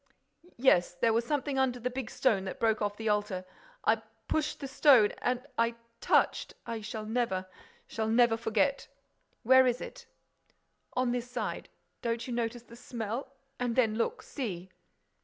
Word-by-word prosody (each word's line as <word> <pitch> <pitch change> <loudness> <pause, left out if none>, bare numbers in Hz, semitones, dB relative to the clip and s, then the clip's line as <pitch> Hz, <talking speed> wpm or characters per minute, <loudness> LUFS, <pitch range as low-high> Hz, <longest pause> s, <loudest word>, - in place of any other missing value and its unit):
"Yes—there 225 -3 +3
was 230 +1 +1
something 285 0 -1
under 255 -2 +1
the 250 +2 -2
big 255 -2 -4
stone 210 -7 +2
that 190 - -6
broke 220 -1 +2
off 205 0 -1
the 225 - -4
altar—I 210 - -1 0.3
pushed 310 -1 -1
the 275 - -5
stone—and 255 -2 +4
I 230 0 +2 0.2
touched—I 230 -1 0
shall 215 0 -5
never—shall 220 -1 -3
never 230 0 +4
forget.—" 225 +4 0 0.6
"Where 260 +2 +7
is 245 0 +1
it?" - - -9 0.9
"On 250 -1 +1
this 245 0 -3
side.—Don't 235 -1 -5
you 250 - -4
notice 235 0 -2
the 235 - -14
smell?—And 245 +2 -5
then 230 -4 +3
look—see." 230 - -3
235 Hz, 130 wpm, -30 LUFS, 220-260 Hz, 0.9 s, Where